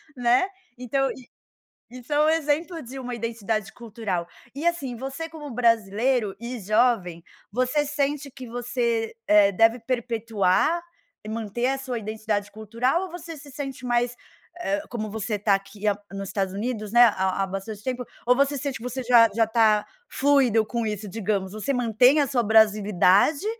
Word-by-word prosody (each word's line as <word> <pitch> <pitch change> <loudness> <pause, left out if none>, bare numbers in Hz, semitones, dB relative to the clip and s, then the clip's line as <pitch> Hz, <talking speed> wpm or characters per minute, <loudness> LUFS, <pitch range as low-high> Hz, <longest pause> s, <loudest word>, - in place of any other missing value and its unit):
né, 245 +7 +3 0.3
então 270 +2 0
i 255 -2 -12 0.6
isso 250 +3 -12
é 295 - +2
um 310 - +4
exemplo 320 +2 0
de 260 +1 -9
uma 250 -2 -5
identidade 225 -2 -3
cultural. 210 -7 -4 0.3
E 295 +4 -5
assim, 285 -8 -1
você 270 +6 -6
como 300 -4 -9
brasileiro 230 -1 +1
e 235 +1 -5
jovem, 205 -5 +1 0.3
você 255 +6 +1
sente 285 -1 -2
que 255 -1 -10
você, 235 -1 -2
eh, 205 -1 +6
deve 225 +5 +3
perpetuar 230 - 0 0.4
e 215 - -8
manter 230 +2 -2
a 270 0 0
sua 255 -3 -4
identidade 215 -1 -3
cultural 230 - -1
ou 375 - -7
você 340 -2 -8
se 285 0 -13
sente 270 -3 -6
mais, 245 0 +1 0.4
eh, 200 - -1
como 215 -3 -4
você 215 0 -2
tá 205 0 +2
aqui 195 +2 -3
há 205 - +3 0.2
nos 195 -1 -6
Estados 195 -2 -1
Unidos, 215 -1 -3
né, 240 +1 +6
há 190 -3 +1
há - - 0
bastante 195 +2 -6
tempo? 255 -1 -3 0.2
Ou 250 +1 +5
você 280 +1 +1
sente 275 0 -3
que 225 - -13
você 250 +1 -4
já 235 -2 +6
já 225 -1 +4
tá 220 -2 +3 0.2
fluido 260 -6 +3
com 235 -1 -2
isso, 210 0 -4
digamos? 195 -2 -2
Você 215 +6 -2
mantém 250 +4 +4
a - - +3
sua 245 -3 +1
brasilidade 210 - +4
235 Hz, 170 wpm, -25 LUFS, 210-265 Hz, 0.6 s, eh